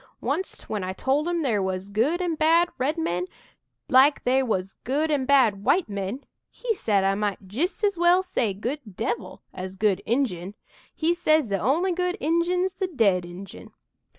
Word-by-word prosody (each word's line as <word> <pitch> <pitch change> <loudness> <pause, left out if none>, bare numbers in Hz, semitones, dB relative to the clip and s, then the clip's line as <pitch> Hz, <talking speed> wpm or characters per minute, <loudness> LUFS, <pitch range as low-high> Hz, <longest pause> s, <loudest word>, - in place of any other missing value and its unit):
"Oncet 380 - -3
when 210 -3 -3
I 185 0 -3
told 275 - 0
'im 345 -2 0
there 220 -7 +1
was 190 +1 -3
good 285 - +1
an' 345 -2 0
bad 330 +2 +3
red 290 +6 0
men 180 - -1 0.6
like 265 +3 +5
they 260 +2 +3
wuz 220 -8 0 0.2
good 300 +5 0
an' 280 -3 +1
bad 235 -8 +4
white 360 - +2
men, 200 +5 -4 0.3
he 485 -2 -2
said 205 - +1
I 195 0 +2
might 200 -1 -3
jist 310 - -2
as 400 -4 +1
well 350 +2 +5
say 255 - -1
'good 245 +9 -3 0.2
devil' 225 -3 -4
as 185 0 -6
'good 200 -1 +1
Injun!' 210 -7 -1 0.4
He 330 +2 +1
says 310 -6 +2
'the 195 -1 0
only 330 - +1
good 360 +2 -1
Injun's 355 +4 +1
the 380 - -2
dead 200 - +2
Injun!' 180 +2 -11
260 Hz, 180 wpm, -25 LUFS, -, 0.6 s, like